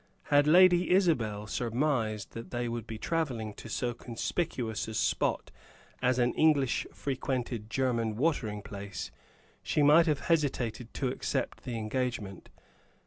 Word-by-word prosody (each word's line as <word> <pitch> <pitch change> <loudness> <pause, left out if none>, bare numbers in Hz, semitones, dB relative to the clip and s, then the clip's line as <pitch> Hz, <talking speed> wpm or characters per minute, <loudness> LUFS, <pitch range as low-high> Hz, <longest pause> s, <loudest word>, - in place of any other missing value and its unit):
Had 145 0 +5
Lady 180 +2 +6
Isabel 125 - +2
surmised 115 -3 -1
that 115 0 -8
they 120 0 -2
would 115 -1 -4
be 110 - -5
travelling 120 -7 -2
to 115 - -10
so 120 +2 -1
conspicuous 120 0 -3
a 110 - -6
spot - - 0 0.5
as 125 0 +2
an 120 -1 +2
English 145 -5 +2
frequented 125 -5 -3
German 115 -3 0
watering 115 -7 -1
place, 100 -1 -6 0.5
she 150 - +1
might 155 +4 +6
have 150 -3 +1
hesitated 130 -7 0
to 130 - 0
accept - - -3
the 120 -2 -3
engagement. 110 -4 -3
125 Hz, 135 wpm, -30 LUFS, 110-145 Hz, 0.5 s, Lady